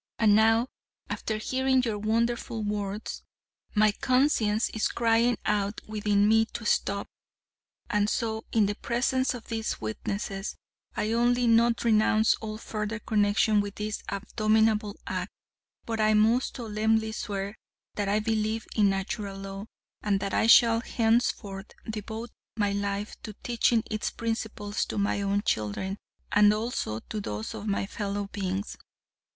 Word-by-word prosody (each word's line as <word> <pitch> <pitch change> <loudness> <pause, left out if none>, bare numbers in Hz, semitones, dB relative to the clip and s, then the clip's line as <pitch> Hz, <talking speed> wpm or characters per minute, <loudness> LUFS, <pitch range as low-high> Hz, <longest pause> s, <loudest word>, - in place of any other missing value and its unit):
And 210 -2 +5
now, 225 +2 +4 0.4
after 220 - -2
hearing 260 +3 +1
your 220 -4 -1
wonderful 230 +1 0
words, 205 0 -3 0.5
my 215 0 +5
conscience 235 -3 +2
is 220 - 0
crying 230 0 +2
out 205 0 0
within 210 -1 +2
me 225 +1 +5
to 230 - -5
stop, 200 -1 0 0.8
and 210 0 +1
so, 220 -2 -1
in 220 -2 +4
the 205 - 0
presence 250 +4 0
of 235 - -10
these 225 -1 -2
witnesses, 195 - -4 0.4
I 215 - 0
not 230 - +1
only 245 +1 +3 0.4
renounce 220 -1 +4
all 215 -1 -5
further 215 0 -4
connection 210 -1 +2
with 205 -1 -5
this 210 0 -3
abominable 215 0 +1
act, 185 +1 -3 0.6
but 225 -1 -3
I 215 0 +4
most 225 +4 +3
solemnly 220 -1 0
swear 200 -1 -4 0.4
that 205 -1 -2
I 210 +1 +2
believe 220 0 -1
in 205 -2 +4
Natural 195 +1 -3
Law, 195 +1 -7 0.3
and 200 -2 +1
that 195 - -3
I - - +3
shall 230 0 +7
henceforth 225 -4 0 0.2
devote 220 +2 -5 0.3
my 205 -2 +1
life 200 +1 -3
to 215 - -7
teaching 235 -1 +2
its 215 -1 -1
principles 220 -2 -3
to - - -5
my 200 0 +1
own 200 +1 0
children, 190 - -1 0.3
and 205 0 +6
also 215 - -3
to 215 - -5
those 105 - -4
of 210 - -6
my 200 -1 0
fellow 205 0 -3
beings. 195 0 -3
215 Hz, 145 wpm, -28 LUFS, 205-225 Hz, 0.8 s, shall